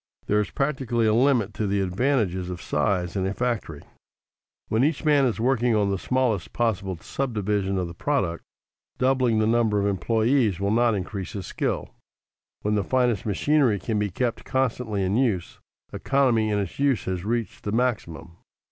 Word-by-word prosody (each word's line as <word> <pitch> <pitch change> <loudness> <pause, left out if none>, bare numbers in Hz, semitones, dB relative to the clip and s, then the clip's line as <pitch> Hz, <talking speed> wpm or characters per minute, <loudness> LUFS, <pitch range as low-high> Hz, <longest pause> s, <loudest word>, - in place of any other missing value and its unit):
_ - - -33
There 105 - +2
is 105 - -1
practically 130 -5 -1
a 110 - +3
limit 120 -4 +2
to 105 - -2
the 100 +1 0
advantages 95 -2 0
of 90 -1 -5
size 90 +2 -1
in 95 -1 0
a 95 - -3
factory. 115 - -2 0.8
When 110 +3 +1
each 155 +2 0
man 145 -3 +4
is 120 -3 -1
working 120 -1 +2
on 100 -2 +2
the 95 - -1
smallest 125 -5 0
possible 100 -6 -1
subdivision 105 -3 -2
of 90 - 0
the 85 - -8
product, 90 - -1 0.5
doubling 130 -3 +2
the 110 - +2
number 110 -2 +2
of 100 - 0
employees 110 +2 +1
will 100 +1 0
not 115 0 +3
increase 95 0 -5
his 100 -3 -5
skill. - - -3 0.7
When 105 - 0
the 105 -1 +1
finest 120 -2 +1
machinery 130 +1 +2
can 110 +2 -2
be 105 -1 0
kept 120 +5 -2
constantly 125 -6 -1
in 95 +3 +1
use, 110 -10 -1 0.3
economy 125 -6 +2
in 105 - +1
its 100 +2 -4
use 140 -4 +1
has 90 -2 -3
reached 115 +1 -3
the 105 - -3
maximum. 90 -9 -2
110 Hz, 175 wpm, -25 LUFS, 95-125 Hz, 0.8 s, man